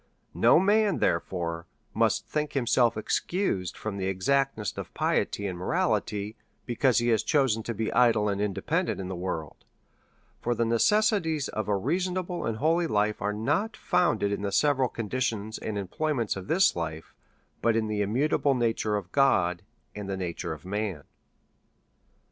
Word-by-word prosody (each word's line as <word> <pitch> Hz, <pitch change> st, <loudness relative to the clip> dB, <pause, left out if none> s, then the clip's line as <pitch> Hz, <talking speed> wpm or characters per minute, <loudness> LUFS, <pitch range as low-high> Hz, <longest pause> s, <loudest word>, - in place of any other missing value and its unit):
No -, -, +5 dB
man^ 205 Hz, 0 st, +3 dB
therefore^ 85 Hz, -1 st, -1 dB, 0.3 s
must -, -, +1 dB
think 150 Hz, -1 st, -2 dB
himself 120 Hz, -3 st, +2 dB
excused 110 Hz, -, -1 dB
from 110 Hz, -2 st, -4 dB
the 95 Hz, -1 st, -2 dB
exactness 110 Hz, +3 st, 0 dB
of -, -, -7 dB
piety 100 Hz, -, 0 dB
and 90 Hz, -3 st, -4 dB
morality^ 105 Hz, +3 st, -1 dB, 0.3 s
because 120 Hz, +1 st, +2 dB
he 120 Hz, 0 st, +2 dB
has 110 Hz, -3 st, +3 dB
chosen 130 Hz, -7 st, +2 dB
to 115 Hz, -, -4 dB
be 110 Hz, +1 st, -2 dB
idle 115 Hz, -3 st, +4 dB
and 100 Hz, 0 st, -1 dB
independent 105 Hz, -1 st, -1 dB
in 95 Hz, -1 st, -5 dB
the 95 Hz, -, -4 dB
world; 85 Hz, -4 st, -5 dB, 0.8 s
for 120 Hz, 0 st, -1 dB
the 115 Hz, -, +1 dB
necessities 160 Hz, -, +2 dB
of 110 Hz, -2 st, -3 dB
a 105 Hz, -1 st, +1 dB
reasonable 180 Hz, -, -2 dB
and 115 Hz, -1 st, -2 dB
holy 165 Hz, +5 st, +2 dB
life 105 Hz, -4 st, 0 dB
are 105 Hz, +1 st, 0 dB
not 145 Hz, -, -1 dB
founded 110 Hz, -, +1 dB
in 100 Hz, -, -2 dB
the 100 Hz, -1 st, -2 dB
se\cral 135 Hz, +1 st, +2 dB
conditions 110 Hz, -2 st, -3 dB
and 105 Hz, -2 st, -4 dB
employments 115 Hz, -, -1 dB
of 95 Hz, -1 st, -7 dB
this 190 Hz, -, +4 dB
lifC;, 80 Hz, -2 st, -4 dB, 0.6 s
but 115 Hz, +1 st, +2 dB
in 115 Hz, -1 st, +1 dB
the 105 Hz, -1 st, -1 dB
immutable 135 Hz, +6 st, +1 dB
nature 115 Hz, -3 st, 0 dB
of 100 Hz, -3 st, -4 dB
God^ 90 Hz, -11 st, +3 dB, 0.3 s
and 105 Hz, -2 st, -6 dB
the 95 Hz, -, -2 dB
nature 90 Hz, -3 st, -4 dB
of -, -, -8 dB
man. 100 Hz, -5 st, -3 dB
110 Hz, 160 wpm, -27 LUFS, 100-140 Hz, 0.8 s, No